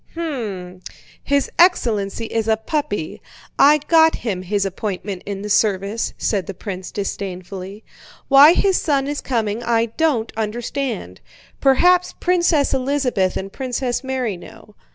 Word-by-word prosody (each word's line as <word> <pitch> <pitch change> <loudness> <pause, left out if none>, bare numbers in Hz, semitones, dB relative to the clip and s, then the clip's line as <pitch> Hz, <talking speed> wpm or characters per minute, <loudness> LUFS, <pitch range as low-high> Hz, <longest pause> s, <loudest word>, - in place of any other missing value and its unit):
"Hm!—his 235 - -4
excellency 230 - +2
is 225 0 -2
a 220 -1 +3
puppy.... 220 - -3 0.4
I 295 +2 +7
got 320 -1 +5
him 200 -6 -3
his 200 +2 -1
appointment 195 -1 -4
in 200 -1 -5
the 210 - -5
service," 205 +1 0
said 195 -6 -1
the 195 - -6
prince 185 -1 -6
disdainfully. 195 0 -6 0.4
"Why 285 +4 +8
his 385 0 +2
son 280 -4 0
is 290 0 -3
coming 225 -3 -2
I 230 -1 +1
don't 285 -9 +1
understand. 225 - -4 0.4
Perhaps 355 +7 +3
Princess 345 -5 +2
Elizabeth 255 -8 0
and 195 +1 -6
Princess 255 -1 -2
Mary 255 -7 -2
know. 205 +4 -14
225 Hz, 130 wpm, -20 LUFS, 195-280 Hz, 0.4 s, Why